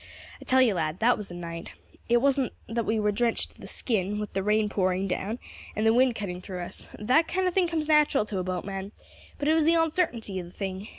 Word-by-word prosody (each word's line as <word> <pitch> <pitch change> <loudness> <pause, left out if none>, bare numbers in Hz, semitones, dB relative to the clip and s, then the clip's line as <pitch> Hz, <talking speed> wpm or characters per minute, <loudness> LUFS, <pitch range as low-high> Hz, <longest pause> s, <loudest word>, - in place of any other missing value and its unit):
"I - - -10
tell 260 0 +5
you, 230 -5 +3
lad, 160 -2 -1
that 235 +4 +4
was 210 - -7
a 175 - -8
night. 170 -1 -7 0.4
It 240 +1 +4
wasn't 275 -3 +2
that 230 0 -2
we 220 0 +1
was 210 0 +1
drenched 230 +2 0
to - - -19
the - - -8
skin 210 -4 -1
with 210 -1 -4
the 195 - 0
rain 210 +2 +2
pouring 190 -1 0
down, 195 +5 -2 0.4
and 215 - 0
the 225 - +5
wind 250 0 +4
cutting 180 -4 -4
through 185 -1 -6
us - - -7
that 260 +10 +3
kind 375 0 0
of 365 - 0
thing 370 -1 +3
comes 320 -2 -2
natural 300 -6 +4
to 205 -3 -3
a - - -1
boatman 190 +2 -4 0.4
but 290 - -2
it 310 - +5
was 320 -1 +3
the 330 +1 +5
oncertainty 315 - 0
of 175 - -6
the - - -13
thing. 190 +1 -5
215 Hz, 245 wpm, -27 LUFS, 190-260 Hz, 0.4 s, tell